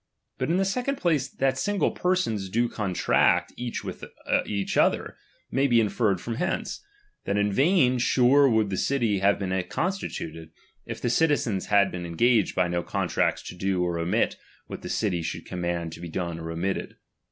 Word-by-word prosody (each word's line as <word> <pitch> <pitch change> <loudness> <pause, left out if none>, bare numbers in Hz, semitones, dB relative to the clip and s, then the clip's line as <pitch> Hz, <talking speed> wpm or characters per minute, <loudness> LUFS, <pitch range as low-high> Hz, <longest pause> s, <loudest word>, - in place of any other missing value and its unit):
But - - -1
in 170 - +2
the 195 - +2
second 250 +8 -1
place, 155 - +1
that 135 0 0
single 205 +6 +1
persons 145 - -1
do 120 +5 +1
contract 100 -6 +1
each 120 -1 -4
with - - -7 0.2
other, 100 -2 +1 0.4
may 135 +2 +2
be 120 -3 +4
inferred 105 -3 +1
from 115 +4 -5
hence; 180 - -2 0.4
that 100 - 0
in 100 0 +1
vain 135 - +3
sure 130 +3 +4
would 110 -3 +2
the 95 - -1
city 115 -6 +1
have 100 +1 +3
been 95 -1 -1
constituted, 170 - -3 0.4
if - - -5
the 120 - -1
citizens 125 -9 +1
had 100 -1 +4
been 90 -1 -5
engaged 110 +5 +2
by 90 - +2
no 85 0 -1
contracts - - -1
to - - -8
do 95 0 0
or 85 -1 -1
omit 85 +1 0 0.3
what - - -8
the - - -7
city 95 -6 0
shoidd - - -5
command 85 -2 -3
to 80 - -10
be 85 - -6
done 85 -1 -3
or 80 0 -6
omitted. 90 +4 -3
105 Hz, 175 wpm, -26 LUFS, 90-135 Hz, 0.4 s, be